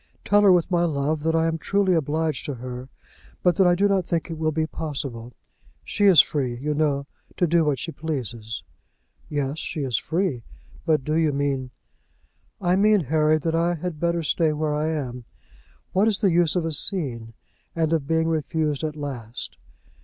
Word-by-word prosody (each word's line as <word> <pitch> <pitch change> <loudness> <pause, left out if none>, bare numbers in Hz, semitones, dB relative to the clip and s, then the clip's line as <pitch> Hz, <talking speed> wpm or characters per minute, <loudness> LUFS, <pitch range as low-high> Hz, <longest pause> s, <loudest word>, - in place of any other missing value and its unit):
Tell 205 +1 +4
her 200 -2 +6
with 180 0 +3
my 175 -1 +3
love, 150 -1 0
that 160 +1 +1
I 165 0 +3
am 165 0 -1
truly 200 +2 +1
obliged 155 -1 0
to 145 - -3
her, 125 +1 -7 0.5
but 180 -2 +4
that 190 - +5
I 175 - +4
do 200 +3 +3
not 195 -3 +1
think 170 0 -2
it 165 - -5
will 155 -1 +1
be 160 +1 0
possible. 135 -7 -5 0.5
She 205 - 0
is 185 -6 +7
free, 130 -5 +3
you 150 +4 -2
know, 145 -2 0 0.3
to 175 - +3
do 170 0 +3
what 150 -3 +1
she 165 - -4
pleases." 120 - -5 0.7
"Yes, 145 +1 -2
she 155 - -4
is 125 -5 0
free. 165 -6 -1 0.5
But 155 -4 +2
do 155 - -2
you 160 -1 +2
mean 140 -2 -1 0.5
?" - - -41
"I 180 -1 +2
mean, 210 0 +4
Harry, 155 +1 +2
that 160 +1 -2
I 170 +1 +1
had 170 -1 -5
better 170 0 0
stay 155 +1 +1
where 150 0 -1
I 150 +1 0
am. 125 -6 -4 0.7
What 195 +4 +3
is 210 -3 +1
the 195 -4 +4
use 170 -1 +3
of 175 -2 0
a 165 - -1
scene, 130 - -1 0.4
and 165 -1 +1
of 150 -4 0
being 160 +1 +1
refused 155 -2 -1
at 155 -1 -2
last? 125 -6 -6
155 Hz, 195 wpm, -24 LUFS, 140-170 Hz, 0.7 s, is